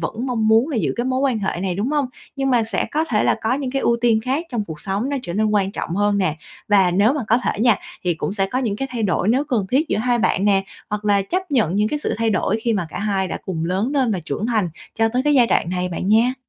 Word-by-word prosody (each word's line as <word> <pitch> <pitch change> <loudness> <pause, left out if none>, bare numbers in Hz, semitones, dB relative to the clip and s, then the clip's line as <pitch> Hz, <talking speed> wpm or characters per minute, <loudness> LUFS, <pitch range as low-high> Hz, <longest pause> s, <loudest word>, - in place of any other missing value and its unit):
vẫn 235 +4 -3
mong 225 -4 0
muốn 225 +5 +4
là 290 - -2
giữ 220 - 0
cái 240 - -1
mối 260 0 0
quan 265 -5 +1
hệ 195 -3 -2
này, 185 -2 -1
đúng 210 +8 -1
hông? 295 -2 +1 0.3
Nhưng 270 0 0
mà 240 -3 +3
sẽ 220 -4 -1
có 310 +2 0
thể 220 -9 0
là - - +3
có 225 +3 +1
những 265 -2 -3
cái 270 0 -1
ưu 235 - +3
tiên 230 -2 +3
khác 285 +7 -1
trong 225 -4 -1
cuộc 160 -5 -8
sống 200 +7 -2
nó 285 - -1
trở 170 - -5
nên 215 +3 +1
quan 200 -2 +1
trọng - - -4
hơn 205 0 +2
nè. 175 -6 0 0.3
Và 195 -3 +4
nếu 200 +8 +3
mà 295 - -2
có 230 - +4
thể 245 - -2
nha, 235 -3 +4 0.3
thì 175 -1 +1
cũng 165 - -3
sẽ 195 -2 0
có 250 +6 -2
những 225 -6 -1
cái 270 +4 -3
thay 240 -2 -3
đổi 195 -1 +1
nếu 260 +6 +2
cần 240 -9 -1
thiết 295 +5 +2
giữa - - 0
hai 245 +1 +1
bạn 200 -3 +1
nè, 195 -2 +3 0.3
hoặc 210 0 -3
là 200 -1 +3
chấp 365 - -3
nhận 215 - +1
những 210 +1 +2
cái 300 - -2
sự - - -2
thay 225 0 +1
đổi 205 +2 0
khi 235 - +1
mà 185 -6 -1
cả - - -6
hai 195 -2 0
đã - - -4
cùng 165 -4 -2
lớn 190 +8 0
lên 260 -6 +2
và 185 - -2
trưởng 200 +11 -3
thành 215 -6 +1 0.3
cho 225 0 +2
tới 255 +1 +1
cái 295 0 +2
giai 245 -3 +5
đoạn 175 - +1
này 180 0 -1
bạn 180 +2 -3
nha. 235 +4 +4
220 Hz, 300 wpm, -21 LUFS, 195-255 Hz, 0.3 s, giai